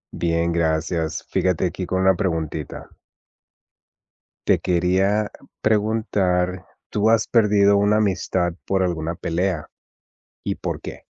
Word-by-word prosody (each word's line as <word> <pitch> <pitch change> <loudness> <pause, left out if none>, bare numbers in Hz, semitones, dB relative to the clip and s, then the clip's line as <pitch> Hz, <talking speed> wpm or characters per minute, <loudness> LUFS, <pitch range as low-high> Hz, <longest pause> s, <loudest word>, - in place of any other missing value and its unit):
Bien, 85 0 0
gracias. 80 0 -1
Fíjate 95 -1 +1
aquí 90 +1 -5
con 95 0 0
una 95 0 +5
preguntita. 80 -6 -3 1.6
Te - - +4
quería 95 +4 +1 0.3
preguntar, 100 -4 +1 0.2
¿tú 105 +1 +1
has 115 -1 +3
perdido 100 -3 +4
una 105 +1 +3
amistad 95 -3 0
por 95 -1 +1
alguna 85 -2 -2
pelea? 85 -2 -2 0.8
¿Y - - -2
por - - -4
qué? - - -8
95 Hz, 115 wpm, -22 LUFS, 85-100 Hz, 1.6 s, una